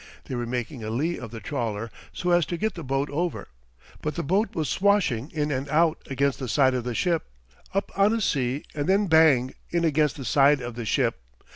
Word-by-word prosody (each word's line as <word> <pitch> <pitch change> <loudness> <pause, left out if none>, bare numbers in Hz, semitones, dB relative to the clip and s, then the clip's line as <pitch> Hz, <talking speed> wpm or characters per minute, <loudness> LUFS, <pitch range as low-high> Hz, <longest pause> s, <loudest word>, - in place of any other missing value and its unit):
They - - -6
were 120 -1 -2
making 120 +1 -4
a 110 - -4
lee 150 +10 -1
of 120 - -7
the 115 0 -8
trawler 115 -4 -3 0.2
so 180 - -2
as 175 -2 +3
to 175 - -3
get 220 +4 -1
the 165 - -7
boat 135 +2 -1
over. 170 +4 -2 0.5
But 150 - -3
the 170 - -2
boat 195 +8 0
was 155 -3 -1
swashing 185 - +2
in 150 -1 -2
and 135 +1 -2
out 160 +2 +2
against 140 0 0
the 130 - -4
side 130 +2 +4
of 125 -2 -1
the 120 -2 -3
ship 170 +2 0 0.4
up 195 +1 -2
on 200 +2 +4
a 230 - +1
sea 135 - 0
and 150 +3 -2
then 200 +2 +4
bang! 155 -7 +4 0.2
in 170 -1 +1
against 150 -2 +2
the 135 - -6
side 140 +5 +4
of 120 -1 -5
the 115 0 -5
ship. 105 - +1
145 Hz, 225 wpm, -25 LUFS, 125-170 Hz, 0.5 s, side